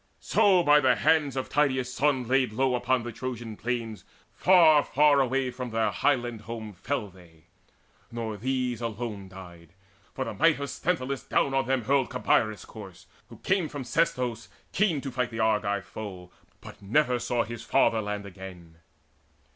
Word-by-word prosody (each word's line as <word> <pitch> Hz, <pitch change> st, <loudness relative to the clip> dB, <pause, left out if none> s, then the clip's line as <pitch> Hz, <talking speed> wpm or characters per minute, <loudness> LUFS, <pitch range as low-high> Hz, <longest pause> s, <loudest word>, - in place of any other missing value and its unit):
So, 185 Hz, -3 st, +3 dB
by 150 Hz, -1 st, +6 dB
the 130 Hz, -3 st, +3 dB
hands 150 Hz, -2 st, +2 dB
of 130 Hz, -, -3 dB
Tydeus' 130 Hz, -4 st, 0 dB
son 135 Hz, -3 st, +1 dB
laid 130 Hz, -3 st, +1 dB
low 130 Hz, +2 st, +1 dB
Upon 125 Hz, 0 st, 0 dB
the 120 Hz, -, -5 dB
Trojan 120 Hz, -2 st, -6 dB
plain, 115 Hz, -2 st, -3 dB, 0.3 s
far, 160 Hz, -1 st, +5 dB
far 145 Hz, 0 st, +3 dB
away 135 Hz, 0 st, 0 dB
From 125 Hz, 0 st, -6 dB
their 115 Hz, 0 st, 0 dB
own -, -, -7 dB
highland 120 Hz, -6 st, 0 dB
home, 110 Hz, -1 st, -7 dB
they 90 Hz, -, -21 dB
fell. 115 Hz, -9 st, -3 dB, 1.0 s
Nor 115 Hz, -2 st, -4 dB
these 125 Hz, +1 st, -2 dB
Alone 110 Hz, -3 st, -5 dB
died; 85 Hz, -3 st, -13 dB, 0.4 s
for 130 Hz, -, -2 dB
the 115 Hz, -, -5 dB
might 165 Hz, -1 st, +3 dB
of 140 Hz, -2 st, -4 dB
Sthenelus 140 Hz, -3 st, -2 dB
Down 135 Hz, -, +1 dB
on 135 Hz, -2 st, 0 dB
them 130 Hz, -2 st, 0 dB
hurled 135 Hz, +2 st, +1 dB
Cabeirus' 110 Hz, -2 st, 0 dB
corse, 95 Hz, -4 st, -12 dB, 0.2 s
who -, -, -12 dB
came 190 Hz, -5 st, +1 dB
From 145 Hz, -2 st, -6 dB
Sestos, 125 Hz, -4 st, -1 dB, 0.2 s
keen 180 Hz, -8 st, +1 dB
to 135 Hz, -, -5 dB
fight 125 Hz, -1 st, -1 dB
the 115 Hz, -, -7 dB
Argive 105 Hz, -3 st, 0 dB
foe, 95 Hz, -3 st, -9 dB, 0.3 s
But -, -, -12 dB
never 125 Hz, +4 st, +1 dB
saw 120 Hz, 0 st, 0 dB
his 115 Hz, -1 st, -8 dB
fatherland 105 Hz, -2 st, +1 dB
again. 90 Hz, -4 st, -11 dB
125 Hz, 165 wpm, -27 LUFS, 110-135 Hz, 1.0 s, by